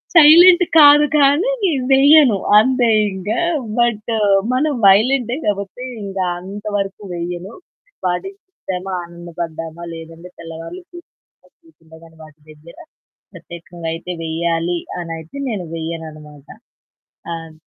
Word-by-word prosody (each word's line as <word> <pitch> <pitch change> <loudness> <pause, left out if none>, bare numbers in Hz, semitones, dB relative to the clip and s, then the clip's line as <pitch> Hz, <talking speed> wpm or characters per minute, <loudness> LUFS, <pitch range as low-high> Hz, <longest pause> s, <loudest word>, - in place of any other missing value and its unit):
Silent 345 +3 +8
కాదు 295 0 +7
కానీ 290 - +3 0.4
వెయ్యను. 275 -4 +6 0.2
అంతే 255 +1 +2 0.3
ఇంకా 205 +5 -3 0.4
బట్టు 230 -1 0 0.4
మనం 295 +4 +1
వయలెంటే 235 +5 +3
కాబట్టి 200 +4 -3 0.2
ఇంకా 195 -1 -3 0.2
అంతవరకు 200 +1 -5
వెయ్యను. 175 +3 -6 0.5
వాటిని 180 - -2
చూశామా, 190 - -7
ఆనందపడ్డామా 170 -1 -8
లేదంటే 165 +2 -11
తెల్లవారులు 165 - -9
కూర్చొని 165 - -19
వాటి 155 -1 -17
దగ్గర 155 +2 -16 0.6
ప్రత్యేకంగా 170 0 -10
అయితే 175 +2 -7
వేయాలనయితే 165 - -4
నేను 205 -6 -4
వెయ్యననమాట. 155 -3 -8 0.9
ఆహ్, 165 -1 -9
185 Hz, 90 wpm, -18 LUFS, 165-250 Hz, 0.9 s, Silent